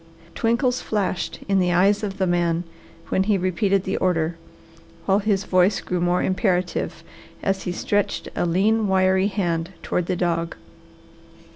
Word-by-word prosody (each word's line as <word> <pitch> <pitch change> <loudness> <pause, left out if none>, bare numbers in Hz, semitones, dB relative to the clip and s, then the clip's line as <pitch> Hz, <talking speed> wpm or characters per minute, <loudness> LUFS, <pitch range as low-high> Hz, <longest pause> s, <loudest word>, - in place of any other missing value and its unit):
Twinkles 245 +2 +1
flashed 200 -4 -2
in 195 -1 +3
the 180 -1 +2
eyes 195 +4 +3
of 200 -2 -4
the 190 - +1
man 175 -1 +1 0.5
when 190 - +1
he 210 -1 +2
repeated 185 +1 +1
the 190 - -2
order, 165 -2 0 0.7
while 195 +1 +3
his 200 -2 0
voice 185 +2 +3
grew 180 -1 -3
more 175 +1 +1
imperative 185 -2 -1 0.4
as 195 0 -1
he 180 - -1
stretched 205 +3 -1
a 175 - 0
lean, 210 +5 +2
wiry 190 0 +3
hand 175 -3 -2
toward 180 -1 -1
the 185 - 0
dog. 170 -2 -1
190 Hz, 150 wpm, -23 LUFS, 175-200 Hz, 0.7 s, in